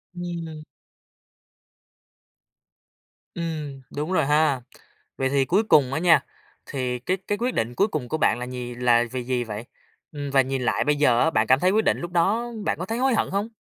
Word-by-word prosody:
Ừm. 170 Hz, -3 st, -6 dB, 2.7 s
Ừm, 155 Hz, -5 st, -5 dB
đúng 150 Hz, +5 st, -3 dB
rồi 160 Hz, -6 st, +2 dB
ha. 150 Hz, -3 st, +2 dB, 0.6 s
Vậy 130 Hz, 0 st, 0 dB
thì 135 Hz, -1 st, +2 dB
cuối 195 Hz, +9 st, +2 dB
cùng 135 Hz, -10 st, +4 dB
á 160 Hz, -, 0 dB
nha, 165 Hz, -5 st, +4 dB, 0.4 s
thì 125 Hz, -2 st, -3 dB
cái 185 Hz, +9 st, -1 dB
cái 205 Hz, -, 0 dB
quyết 245 Hz, +2 st, -1 dB
định 120 Hz, +2 st, -2 dB
cuối 200 Hz, -, +3 dB
cùng 150 Hz, -, -4 dB
của 155 Hz, -, -1 dB
bạn 140 Hz, -, +2 dB
là 125 Hz, -, -4 dB
nhì 125 Hz, -1 st, -6 dB
là 120 Hz, -1 st, +3 dB
gì 125 Hz, +1 st, -5 dB
gì 125 Hz, -1 st, -1 dB
vậy? 110 Hz, +1 st, -6 dB, 0.5 s
Ừm, 145 Hz, -2 st, -5 dB
và 135 Hz, -1 st, +5 dB
nhìn 130 Hz, 0 st, -2 dB
lại -, -, +1 dB
bây 150 Hz, 0 st, +2 dB
giờ 125 Hz, -5 st, +3 dB
á, 160 Hz, -, +4 dB
bạn 110 Hz, -5 st, +1 dB
cảm 130 Hz, +1 st, +5 dB
thấy 185 Hz, +3 st, +3 dB
quyết 220 Hz, +1 st, +2 dB
định -, -, +2 dB
lúc 175 Hz, 0 st, -6 dB
đó 215 Hz, +8 st, +1 dB
bạn -, -, 0 dB
có 180 Hz, -, -3 dB
thấy 225 Hz, +3 st, -3 dB
hối 265 Hz, -1 st, +2 dB
hận -, -, 0 dB
hông? 200 Hz, +3 st, -1 dB
145 Hz, 205 wpm, -24 LUFS, 125-175 Hz, 2.7 s, và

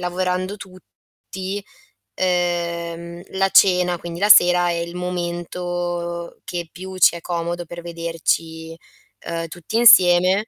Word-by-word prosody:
lavorando 185 Hz, +2 st, -2 dB
tutti, 190 Hz, 0 st, -9 dB, 0.5 s
ehm, 170 Hz, -1 st, -2 dB, 0.2 s
la 195 Hz, 0 st, +2 dB
cena, 180 Hz, -3 st, +4 dB
quindi 170 Hz, 0 st, -7 dB
la 205 Hz, +2 st, +1 dB
sera, 175 Hz, -3 st, +6 dB
è 170 Hz, -, -1 dB
il 170 Hz, +1 st, -5 dB
momento 175 Hz, -1 st, -4 dB
che 175 Hz, -2 st, -6 dB
più 190 Hz, +1 st, -9 dB
ci 180 Hz, -, +5 dB
è 170 Hz, -, -8 dB
comodo 170 Hz, 0 st, -4 dB
per 170 Hz, +1 st, -9 dB
vederci, 165 Hz, -1 st, -3 dB, 0.5 s
uhm, 165 Hz, 0 st, -3 dB
tutti 175 Hz, +6 st, -5 dB
insieme 185 Hz, -2 st, +6 dB
175 Hz, 120 wpm, -20 LUFS, 170-185 Hz, 0.5 s, sera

